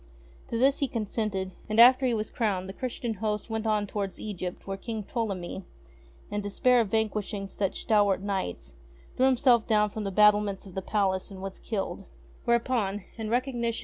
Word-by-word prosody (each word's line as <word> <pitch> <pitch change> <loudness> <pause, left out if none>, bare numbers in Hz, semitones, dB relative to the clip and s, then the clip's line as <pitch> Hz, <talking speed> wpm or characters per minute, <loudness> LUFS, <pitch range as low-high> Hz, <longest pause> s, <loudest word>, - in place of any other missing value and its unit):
To 230 - -2
this 270 +3 +3
he 280 - +1
consented, 210 -4 -2 0.2
and, 215 +1 +1
after 255 +2 +8
he 245 - +1
was 215 0 -3
crowned, 195 -5 -1
the 190 - -6
Christian 240 0 -3
host 210 +1 -3
went 220 0 -2
on 210 -1 +2
towards 200 -2 -4
Egypt 185 -4 -5
where 195 - -3
King 220 +2 -5
Ptolemy, 195 -5 -3 0.7
In 205 0 -1
despair 240 +5 +3
of 225 - -1
vanquishing 210 -2 -1
such 195 0 -2
stalwart 205 -4 +3
knights, 190 - -3 0.4
threw 260 - +4
himself 250 -3 +4
down 210 -2 +3
from 215 - -4
the 200 - -2
battlements 210 0 +4
of 190 - -11
the 190 - -3
palace 190 -2 0
and 195 -2 -9
was 195 0 -6
killed, 195 -2 -4 0.4
Whereupon, 235 -4 +1
in 220 -2 -4
recognition 240 0 0
of 230 - -2
ST. - - -3
210 Hz, 185 wpm, -28 LUFS, 195-230 Hz, 0.7 s, after